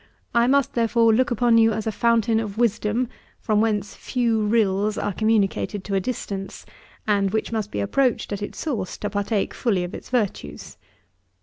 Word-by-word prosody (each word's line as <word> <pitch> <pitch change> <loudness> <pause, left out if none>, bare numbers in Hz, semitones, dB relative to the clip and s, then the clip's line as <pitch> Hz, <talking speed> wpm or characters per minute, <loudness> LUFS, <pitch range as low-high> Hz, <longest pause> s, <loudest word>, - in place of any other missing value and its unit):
I 235 0 +4
must, 280 0 +2
therefore, 230 -1 +3
look 255 +3 +2
upon 240 -1 +3
you 225 0 +4
as 215 0 -3
a 220 - 0
fountain 230 0 +2
of 210 -2 -5
wisdom, 230 +1 +1 0.3
from 215 -1 +1
whence 210 -3 0
few 230 -3 0
rills 210 -1 +1
are 205 - -2
communicated 210 -1 0
to 200 - -5
a 195 - +3
distance, 195 -3 -5 0.4
and 200 -2 +2
which 220 +3 -2
must 215 -2 -2
be 100 - -3
approached 250 - 0
at 200 - -4
its 205 - -6
source, 250 - -3
to 205 - -4
partake 205 0 -1
fully 200 -7 0
of 175 - -6
its - - -9
virtues. 195 - -3
220 Hz, 180 wpm, -23 LUFS, 205-235 Hz, 0.4 s, I